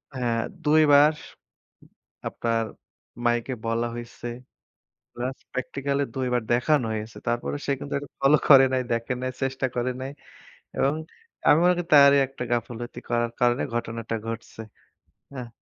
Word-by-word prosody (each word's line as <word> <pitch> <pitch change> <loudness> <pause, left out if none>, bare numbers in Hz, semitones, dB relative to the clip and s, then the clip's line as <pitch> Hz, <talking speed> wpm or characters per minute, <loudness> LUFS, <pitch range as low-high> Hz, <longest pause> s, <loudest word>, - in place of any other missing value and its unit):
হ্যাঁ 120 -2 0 0.2
২ 155 +1 +5
বার 145 +2 +7 1.1
আপনার 115 -1 -1 0.6
মাইকে 120 +2 +1
বলা 115 +1 0
হইছে। 120 0 -8 0.9
প্লাস 125 +2 -4
প্র্যাকটিক্যাল 135 +2 -2
এ - - -1
২ 130 -1 -1
বার 120 -2 +1
দেখানো 125 +2 +2
হয়েছে। 110 +1 -6
তারপরেও 120 +4 -1
সে 140 - +1
কিন্তু 140 - -6
এটা 145 - -10
ফলো 140 +2 +5
করে 135 -2 +9
নাই, 130 - +2
দেখে 115 +2 -1
নাই, 130 0 -2
চেষ্টা 135 0 -1
করে 125 +1 0
নাই। 135 +1 -4 0.7
এবং 140 +2 +2 0.5
আমি 150 - +7
মনে 180 0 +5
করি 175 - -1
তারই 140 -1 +8
একটা 135 -1 -8
গাফিলতি 120 0 -3
করার 120 0 0
কারণে 120 +1 +3
ঘটনাটা 115 -1 -3
ঘটছে, 115 0 -6 0.7
হ্যাঁ। 125 -3 -6
125 Hz, 145 wpm, -25 LUFS, 120-140 Hz, 1.1 s, করে